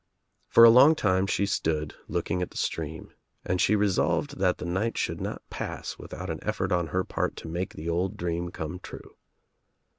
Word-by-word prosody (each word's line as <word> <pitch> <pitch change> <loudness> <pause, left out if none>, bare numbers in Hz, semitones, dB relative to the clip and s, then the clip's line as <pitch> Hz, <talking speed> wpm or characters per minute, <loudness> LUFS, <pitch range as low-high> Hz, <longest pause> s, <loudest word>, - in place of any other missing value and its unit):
For 115 - +7
a 115 - +11
long 135 +7 +7
time 95 -7 +1
she 100 - +1
stood 80 -5 -1
looking 90 - -1
at 90 - -2
the - - -11
stream 80 -1 -4 0.3
and 90 0 0
she 105 - +4
resolved 105 +8 +1
that 90 -2 +2
the - - -6
night 95 +7 -1
should - - -2
not - - -5
pass - - -5
without 90 -1 -6
an 80 - -4
e0ort 100 -3 -2
on 90 -2 +1
her 90 +4 0
part - - -2
to - - -9
make 90 +3 -4
the 80 - -7
old 90 +3 -1
dream 85 0 -2
come 80 0 -6
true. - - -11
90 Hz, 190 wpm, -27 LUFS, 85-100 Hz, 0.3 s, a